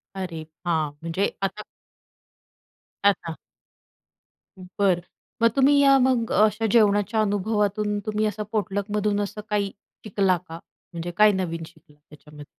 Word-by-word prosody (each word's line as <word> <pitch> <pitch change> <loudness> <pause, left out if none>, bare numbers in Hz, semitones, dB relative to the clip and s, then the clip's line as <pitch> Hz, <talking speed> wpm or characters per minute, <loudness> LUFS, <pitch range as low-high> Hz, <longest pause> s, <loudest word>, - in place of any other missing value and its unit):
अरे! 180 -4 -5 0.2
हां, 160 -4 0
म्हणजे 170 +5 -1
आता 195 +2 -2 1.4
अच्छा. 180 -5 +1 1.2
बरं, 185 -1 0 0.4
मग 230 - +6
तुम्ही 275 +1 +5
या 275 -1 +6
मग 250 -3 +1
अशा 215 +2 +3
जेवणाच्या 215 -1 +3
अनुभवातून 210 0 0
तुम्ही 215 0 0
असं 210 0 -2
पोटलक 205 -1 -2
मधून 205 0 +1
असं 205 +1 -5
काही 205 -1 0 0.3
शिकला 195 -3 +2
का? 165 +1 -8 0.3
म्हणजे 170 +1 -5
काय 210 0 +7
नवीन 170 -4 -3
शिकला 150 -2 -20
त्याच्यामध्ये? 150 0 -13
205 Hz, 125 wpm, -24 LUFS, 175-215 Hz, 1.4 s, काय